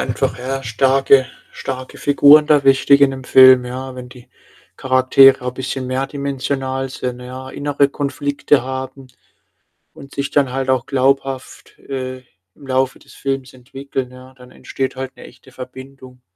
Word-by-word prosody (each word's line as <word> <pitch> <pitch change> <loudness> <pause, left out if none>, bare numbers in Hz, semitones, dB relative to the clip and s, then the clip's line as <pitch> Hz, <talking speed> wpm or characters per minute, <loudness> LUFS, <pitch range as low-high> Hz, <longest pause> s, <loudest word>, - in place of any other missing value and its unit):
einfach, - - -2
ja, 135 +2 -4
starke 135 +3 +3 0.3
starke 130 -1 -7
Figuren 145 +1 +5
da 150 -3 +3
wichtig 140 +1 +4
in 140 - +5
'nem 130 -1 -8
Film, 130 -1 +6
ja. 130 +1 -7
Wenn 125 -1 -9
die 125 -1 -16 0.5
Charaktere 130 0 +4
'n 125 - -2
bisschen 130 0 -5
mehrdimensional 135 0 -3
sind, 125 -1 -6
ja, 130 +1 -9
innere 145 0 0
Konflikte 145 -1 -1
haben 130 0 -7 0.9
und 140 - -14
sich 140 0 -3
dann 135 -3 +1
halt 135 0 -3
auch 130 -2 +1
glaubhaft, 135 -1 -2
äh, 130 -1 -6 0.4
im 140 - -16
Laufe 130 0 -1
des - - -19
Films 135 -2 -4
entwickeln, 130 0 -7
ja, 130 +1 -15
dann 125 0 -16
entsteht 130 +1 -5
halt 130 0 -7
'ne - - -12
echte 130 +1 -18
Verbindung 130 0 -12
130 Hz, 150 wpm, -18 LUFS, 130-135 Hz, 0.9 s, Film